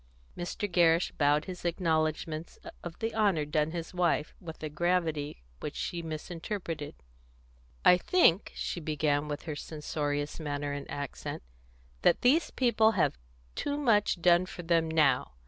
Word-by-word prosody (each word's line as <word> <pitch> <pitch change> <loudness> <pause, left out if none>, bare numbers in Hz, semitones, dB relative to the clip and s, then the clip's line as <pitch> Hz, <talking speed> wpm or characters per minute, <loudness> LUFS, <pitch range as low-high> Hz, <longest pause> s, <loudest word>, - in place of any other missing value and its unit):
Mr. 175 +4 -3
Gerrish 170 -2 +3
bowed 145 +1 +3
his 180 -2 -7
acknowledgments 160 -2 -1 0.3
of 175 -2 -7
the 225 0 -2
honour 200 -9 +2
done 150 +1 +1
his 165 +1 -5
wife, 175 -3 +1
with 160 -3 -9
a - - -1
gravity 160 - -1 0.2
which - - -5
she 170 - -3
misinterpreted. 165 0 -5 0.9
"I 180 - +8
think," 195 - +3
she - - -3
began, 150 -2 0
with 145 -1 -4
her 155 -3 -4
censorious 145 -1 -3
manner 145 -2 -3
and 145 0 -6
accent, 140 - -5 0.6
"that - - +4
these 290 +7 +4
people 225 -3 +3
have 170 - +1 0.3
too 285 0 -2
much 215 -10 +2
done 175 +1 +5
for 175 - -8
them 165 -1 +2
now. 145 - +2
165 Hz, 145 wpm, -30 LUFS, 150-180 Hz, 0.9 s, I